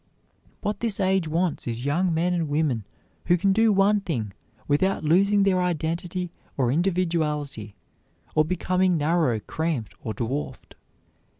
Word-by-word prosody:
What 210 -1 -2
this 225 -4 -2
age 190 -3 +2
wants 165 -1 -1
is 120 +2 -3
young 170 +6 +1
men 170 +2 +1
and 165 -4 -1
women 145 -8 0 0.4
who 175 - +4
can 195 +3 +2
do 225 +2 +4
one 200 +1 +3
thing 115 - -3 0.3
without 175 +5 +1
losing 200 +6 +4
their 185 -2 +2
identity 175 +1 -2 0.3
or 125 -3 +2
individuality, 150 - -1 0.6
or 155 - +4
becoming 185 +2 +1
narrow, 155 -6 +1
cramped, 150 -1 -3
or 110 - -4
dwarfed. 130 +5 -4
170 Hz, 135 wpm, -25 LUFS, 145-185 Hz, 0.6 s, who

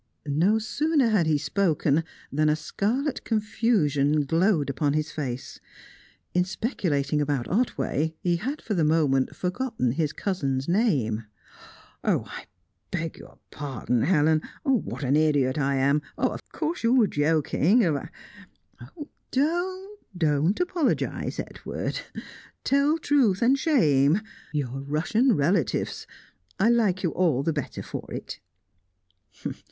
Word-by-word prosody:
No 165 +9 +2
sooner 280 +4 +1
had 200 -7 +2
he 155 -2 +3
spoken 160 -3 +1 0.3
that 155 +2 +2
a 150 - +3
scarlet 240 - -2
confusion 165 - +1
glowed 165 0 +2
upon 140 +1 0
his 155 0 -1
face. 130 -4 -5 0.7
In 180 - +3
speculating 155 - -1
about 140 -4 -1
Otway, 160 - 0
he 175 -1 +2
had 270 - -4
for 215 - -2
the 170 -5 +1
moment 150 -4 +2
forgotten 190 - -1
his 150 +3 -1
cousin's 140 -9 -2
name. 145 - +1 0.8
"I - - -2 0.4
beg 165 -3 -3
your - - -14
pardon, 130 -5 -2
Helen! 155 0 +3 0.2
What 265 - 0
an 135 +2 +2
idiot 145 -3 +2
I 140 -1 +1
am 140 +2 +2 0.2
Of - - 0
course 330 +3 -3
you 235 +2 +3
were 245 -4 +6
joking, 160 - +2
and 150 -4 +1
I - - -10 0.5
" - - -40
"Don't, 300 -4 -11 0.2
don't, 350 +7 0 0.3
don't 155 +3 +2
apologise, 355 -5 -1
Edward! - - -4 0.6
Tell 280 +3 +3
truth 255 - +2
and 255 +3 +5
shame 175 - +3 0.3
your 135 -3 -3
Russian 185 - +1
relatives! 155 - 0 0.5
I 220 - +4
like 205 -6 +2
you 170 - +1
all 160 -7 +1
the 165 - 0
better 145 -4 -4
for - - -7
it." - - -6
165 Hz, 130 wpm, -26 LUFS, 145-225 Hz, 0.8 s, were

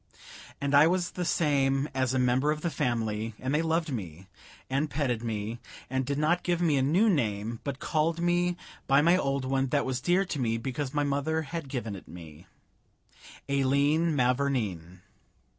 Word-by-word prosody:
And 140 0 -2
I 145 +2 +7
was 180 0 0
the 180 - -3
same 140 -4 +1
as 130 -2 0
a 130 - 0
member 125 +3 +2
of 150 0 -1
the 170 - -1
family; 115 -3 -2
and 130 +2 -3
they 150 - +2
loved 165 -1 0
me, 90 -5 -6 0.4
and 140 +3 -1
petted 130 -5 -1
me, 110 0 -3 0.3
and 130 -1 -1
did 140 0 -1
not 165 +4 +2
give 175 -1 0
me 165 -4 +2
a - - +2
new 170 +12 +3
name, 115 - 0
but 140 -2 -4
called 160 +3 0
me 175 0 +1 0.3
by 140 +2 +5
my 170 +2 +5
old 135 -6 0
one 135 0 0
that 140 +2 0
was 130 -1 -2
dear 180 +5 +2
to 160 -6 -4
me 115 -2 0
because 130 +3 -4
my 145 0 0
mother 145 +3 0
had 160 -1 -6
given 120 -6 -4
it 95 - -11
me 80 -4 -12 1.0
Aileen 140 +4 +2
Mavourneen. 120 - -1
140 Hz, 180 wpm, -28 LUFS, 125-155 Hz, 1.0 s, I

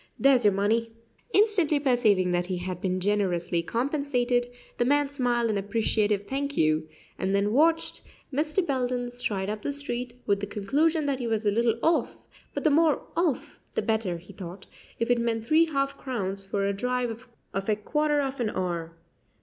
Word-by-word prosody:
There's 270 -3 +4
your 205 -2 +5
money." 225 +4 +1 0.4
Instantly 390 -9 +3
perceiving 225 -9 +3
that 175 0 0
he 185 -1 -2
had 180 0 -5
been 185 -1 0
generously 180 -3 0
compensated, 245 - 0 0.3
the - - +4
man 285 +2 +2
smiled 240 -4 +1
an 205 - 0
appreciative 205 0 0
"Thank 280 +4 -3
you," 155 0 +2 0.3
and 190 +1 0
then 205 +2 +1
watched 325 +4 +2 0.3
Mr. 305 +6 +1
Belden 250 -3 -1
stride 205 -6 -2
up 210 +1 -3
the 285 - -2
street, 250 -4 -4
with 200 -1 +2
the 205 - -4
conclusion 295 - +1
that 275 -2 0
he 240 - -2
was 220 -1 -1
"a 205 - +4
little 230 +1 +2
off;" 330 +1 +2 0.4
but - - -2
the 310 - +4
more 310 0 +3
"off" 335 -7 -1 0.2
the - - 0
better, 220 -6 0
he 170 +2 -13
thought, 185 0 -9 0.3
if 230 +1 0
it 245 - +3
meant 225 -1 -1
three 320 +6 +4
half 275 -1 0
crowns 195 -7 -3
for 195 +1 -1
a 200 - +1
drive 250 +2 -2 0.3
of 195 +2 -2
a 215 - +4
quarter 295 +7 +1
of 270 -1 -3
an 235 -3 0
hour. 170 -4 -3
235 Hz, 180 wpm, -27 LUFS, 200-275 Hz, 0.4 s, your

